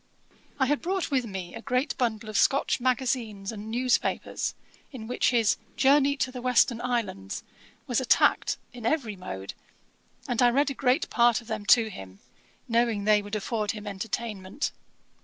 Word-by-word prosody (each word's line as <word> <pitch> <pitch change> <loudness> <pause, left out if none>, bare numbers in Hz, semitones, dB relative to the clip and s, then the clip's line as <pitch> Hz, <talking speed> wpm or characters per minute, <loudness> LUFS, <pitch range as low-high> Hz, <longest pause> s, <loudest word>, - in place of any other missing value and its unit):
I 265 - +4
had 290 +2 0
brought 370 -2 -2
with 255 -4 +1
me 190 -4 -6
a - - -7
great 255 +2 0
bundle 225 -4 -1
of 215 - -7
Scotch 275 +6 +3
magazines 240 -5 -1
and 215 0 -7
news 245 +2 +2
papers, - - -3 0.4
in 250 -6 -8
which 245 +2 +1
his 230 -4 +3 0.2
Journey 280 +1 +4
to 260 - +1
the 250 -1 -7
Western 245 -1 +3
Islands 230 - -3 0.4
was - - 0
attacked - - +3 0.2
in 245 -2 -10
every 235 -4 0
mode; 100 - -7 0.7
and 245 -1 0
I 245 - +6
read 280 +4 +2
a - - -3
great 265 +3 +1
part 240 -1 +4
of 235 - -14
them 215 -2 -5
to 225 -2 +5
him, 95 - -10 0.5
knowing 230 -3 +1
they 210 0 +4
would 205 +1 -6
afford 215 0 -1
him 210 -1 -8
entertainment. 205 +2 -4
235 Hz, 170 wpm, -27 LUFS, 210-255 Hz, 0.7 s, I